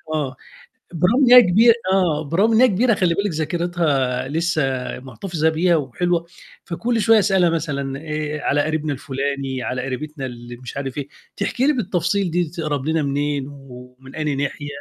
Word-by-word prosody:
آه، 140 -4 -2 0.6
بالرغم 190 - +3
إن 245 - +5
هي 250 0 +11
كبيرة 225 +4 +5 0.2
آه، 175 -6 +2
بالرغم 195 +10 +2
إن 220 - +4
هي 255 - +7
كبيرة 230 +4 +2
خلّي 180 -3 +1
بالِك 200 +3 -1
ذاكرتها 155 -6 -1
لسه 160 0 0 0.4
محتفظة 160 +4 -2
بيها 170 +2 +2
وحلوة، 170 +5 -1 0.4
فكل 230 +7 -1
شوية 225 +1 +5
أسألها 190 -4 +3
مثلًا 140 -4 -3
آآ 155 -1 -4
على 145 - +1
قريبنا 155 -1 -2
الفلاني، 135 -1 -3
على 125 0 -3
قريبتنا 135 +2 -5
اللي 120 -1 -9
مش 125 +2 -10
عارف 135 0 -4
إيه، 140 -1 -4 0.3
تحكي 255 - 0
لي 300 - +4
بالتفصيل 195 - -1
دي 175 +2 +1
تقرب 155 -5 -3
لنا 160 -1 +1
منين 140 0 -1
ومن 130 -1 -13
أي 150 -2 -1
ناحية 145 +1 -3
155 Hz, 165 wpm, -21 LUFS, 140-180 Hz, 0.6 s, هي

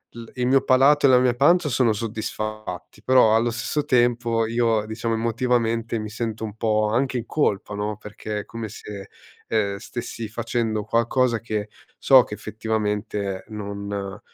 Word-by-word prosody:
il 115 -1 -9
il 125 - -1
mio 135 +1 +4
palato 140 +3 +4
e - - +7
la 125 - +6
mia 125 -1 +3
pancia 165 +4 +4
sono 120 -3 +2
soddisfatti, 110 -2 -5
però 125 -2 +5
allo 115 +2 +3
stesso 145 +5 -2
tempo 120 -3 +2
io, 115 -2 +1
diciamo 110 +1 -3
emotivamente, 115 0 0
mi 105 0 -5
sento 110 0 -4
un 105 -1 -5
po' 110 -1 +1
anche 130 +2 0
in 115 - -4
colpa 105 -9 0
no, 105 +1 -2
perché 105 0 -6
è 105 - -7
come 115 -1 -6
se, 100 -2 -9 0.4
ehm, 100 -3 0
stessi 115 +1 -6
facendo 115 -1 -2
qualcosa 115 +2 +1
che 105 -2 -4 0.3
so 130 -2 +6
che - - -9
effettivamente 105 -2 -3
non 100 -1 -5
115 Hz, 160 wpm, -23 LUFS, 105-120 Hz, 0.4 s, e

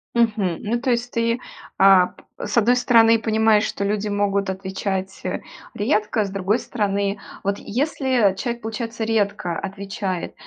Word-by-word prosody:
Мгм. 210 -7 +1
Ну, 235 +3 -1
то 255 +1 0
есть 240 0 -1
ты, 230 +1 0 0.4
а, 190 -2 +7
п - - -19 0.2
с - - -2
одной 240 +3 +4
стороны 230 -2 +5
понимаешь, 220 -1 +3
что 200 - -3
люди 210 +1 -1
могут 200 -1 0
отвечать, 190 0 -3
э, - - -2 0.3
редко, 210 +1 +1
с 195 - -4
другой 195 +4 0
стороны, 200 -4 -1 0.2
вот 200 +1 0
если 255 -4 +1
человек, 235 +3 -3
получается, 225 +1 -4
редко 205 -6 0
отвечает, 195 -2 -4
210 Hz, 150 wpm, -22 LUFS, 195-230 Hz, 0.4 s, а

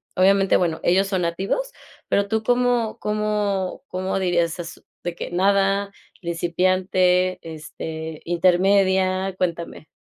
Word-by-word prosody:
obviamente, 195 +1 +4
bueno, 165 -3 0
ellos 190 +3 +3
son 190 -3 -1
nativos. 195 - -2 0.4
Pero 200 0 +1
tú, 220 0 0
¿cómo 245 -2 +1
cómo 210 -3 -1
cómo 185 +1 -2
dirías 175 -2 0
es? 170 -1 -8 0.2
De 175 -1 -3
que - - -6
nada, 195 +2 +2 0.3
principiante, 180 +1 +1
este, 160 0 -7
intermedia. 185 +2 +2
Cuéntame. 170 -3 -3
185 Hz, 115 wpm, -22 LUFS, 175-200 Hz, 0.4 s, obviamente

